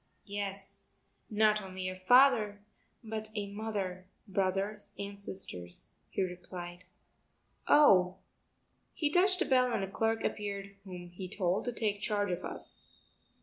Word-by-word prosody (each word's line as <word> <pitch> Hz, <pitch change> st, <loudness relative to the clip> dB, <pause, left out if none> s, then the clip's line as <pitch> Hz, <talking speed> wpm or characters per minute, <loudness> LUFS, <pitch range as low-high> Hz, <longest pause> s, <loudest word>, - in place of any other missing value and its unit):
"Yes, 200 Hz, -1 st, -4 dB, 0.4 s
not 215 Hz, 0 st, +4 dB
only 185 Hz, -1 st, -5 dB
a 185 Hz, -, -3 dB
father, 215 Hz, 0 st, +5 dB, 0.4 s
but 220 Hz, -1 st, -4 dB
a 200 Hz, -1 st, -3 dB
mother, 195 Hz, -4 st, -3 dB, 0.2 s
brothers 195 Hz, +2 st, -1 dB
and 200 Hz, 0 st, -6 dB
sisters," 90 Hz, -, -3 dB, 0.2 s
he -, -, 0 dB
replied. 180 Hz, 0 st, -6 dB, 0.8 s
"Oh...." 185 Hz, -11 st, +6 dB, 0.8 s
He 295 Hz, -2 st, +1 dB
touched 370 Hz, +2 st, +4 dB
a -, -, -5 dB
bell 255 Hz, -2 st, +4 dB
and 205 Hz, -, 0 dB
a 195 Hz, -, -4 dB
clerk 225 Hz, +2 st, +1 dB
appeared 200 Hz, -1 st, -3 dB
whom 180 Hz, -2 st, -8 dB
he 185 Hz, +1 st, -7 dB
told 185 Hz, -1 st, 0 dB
to 245 Hz, -, 0 dB
take 210 Hz, -3 st, -1 dB
charge 205 Hz, -2 st, 0 dB
of 180 Hz, +1 st, -2 dB
us. -, -, -7 dB
200 Hz, 135 wpm, -32 LUFS, 185-215 Hz, 0.8 s, Oh